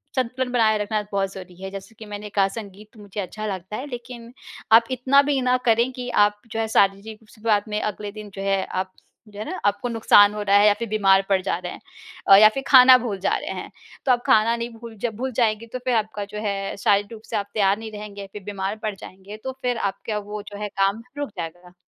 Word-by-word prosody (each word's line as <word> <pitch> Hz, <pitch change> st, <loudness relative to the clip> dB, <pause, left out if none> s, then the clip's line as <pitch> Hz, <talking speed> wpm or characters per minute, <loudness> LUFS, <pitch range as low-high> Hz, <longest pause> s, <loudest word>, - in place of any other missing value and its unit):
संतुलन 255 Hz, 0 st, -1 dB
बनाए 220 Hz, -3 st, +3 dB
रखना 210 Hz, +1 st, -1 dB
बहुत 195 Hz, -1 st, -1 dB
ज़रूरी 185 Hz, -2 st, -10 dB
है। 190 Hz, -, -5 dB
जैसे 195 Hz, +2 st, -9 dB
कि 220 Hz, -, -9 dB
मैंने 210 Hz, 0 st, -7 dB
कहा, 200 Hz, -1 st, +2 dB
संगीत 210 Hz, +1 st, -10 dB
मुझे 205 Hz, -1 st, -8 dB
अच्छा 215 Hz, +3 st, -6 dB
लगता 190 Hz, 0 st, -5 dB
है, 275 Hz, -, -6 dB
लेकिन 240 Hz, -2 st, -9 dB, 0.4 s
आप 225 Hz, +1 st, +8 dB
इतना 260 Hz, +2 st, +4 dB
भी 280 Hz, -2 st, +2 dB
ना 250 Hz, 0 st, +2 dB
करें 235 Hz, +2 st, +3 dB
कि 250 Hz, -1 st, -6 dB
आप 205 Hz, 0 st, 0 dB
जो 225 Hz, -, -3 dB
है 225 Hz, -, 0 dB
शारीरिक 200 Hz, +1 st, +1 dB
शुरुआत 215 Hz, -1 st, 0 dB
में 210 Hz, 0 st, -1 dB
अगले 210 Hz, -1 st, -4 dB
दिन 210 Hz, 0 st, -9 dB
जो 195 Hz, -, -6 dB
है 195 Hz, -1 st, +1 dB
आप 185 Hz, 0 st, -4 dB, 0.4 s
जो 205 Hz, -1 st, -12 dB
है 215 Hz, -, -4 dB
ना 370 Hz, -, -4 dB
आपको 205 Hz, +4 st, 0 dB
नुक़सान 210 Hz, -3 st, +5 dB
हो 210 Hz, -, -4 dB
रहा 200 Hz, -1 st, +2 dB
है 205 Hz, +1 st, +6 dB
या 210 Hz, -, +6 dB
फिर 235 Hz, -, -3 dB
बीमार 195 Hz, -2 st, +4 dB
पड़ 195 Hz, -1 st, +3 dB
जा 190 Hz, -2 st, -1 dB
रहे 180 Hz, 0 st, -6 dB
हैं -, -, -10 dB, 0.5 s
अ, 195 Hz, -, +9 dB
या 215 Hz, +2 st, +9 dB
फिर 270 Hz, -, -3 dB
खाना 255 Hz, -1 st, +9 dB
भूल 225 Hz, -5 st, -4 dB
जा 190 Hz, -, +1 dB
रहे -, -, -6 dB
हैं। -, -, -11 dB, 0.3 s
तो 265 Hz, -, +4 dB
आप 245 Hz, -1 st, +2 dB
खाना 230 Hz, -3 st, +4 dB
नहीं 235 Hz, 0 st, -4 dB
भूल 230 Hz, -1 st, -11 dB
जब 230 Hz, -3 st, -2 dB
भूल 260 Hz, +2 st, -3 dB
जाएँगे 220 Hz, 0 st, +1 dB
तो 255 Hz, -, -3 dB
फिर 250 Hz, -2 st, +2 dB
आपका 215 Hz, -2 st, -2 dB
जो 210 Hz, +1 st, -7 dB
है 195 Hz, -1 st, -2 dB
शारीरिक 200 Hz, +2 st, +2 dB
रूप 220 Hz, -, -10 dB
से -, -, -3 dB
आप 200 Hz, -1 st, -3 dB
तैयार 200 Hz, -1 st, +2 dB
नहीं 220 Hz, -1 st, -7 dB
रहेंगे, 205 Hz, -1 st, -8 dB
फिर 210 Hz, -, -8 dB
बीमार 195 Hz, 0 st, -3 dB
पड़ 215 Hz, -2 st, -2 dB
जाएँगे, 195 Hz, +2 st, -11 dB
तो 260 Hz, +5 st, -5 dB
फिर 250 Hz, -2 st, 0 dB
आपका 200 Hz, +1 st, -3 dB
वो 210 Hz, 0 st, -6 dB
जो 205 Hz, -, -8 dB
है 210 Hz, -, -2 dB
काम 195 Hz, +2 st, 0 dB, 0.2 s
रुक 290 Hz, -2 st, -3 dB
जाएगा। 175 Hz, +1 st, -7 dB
210 Hz, 245 wpm, -23 LUFS, 200-230 Hz, 0.5 s, अ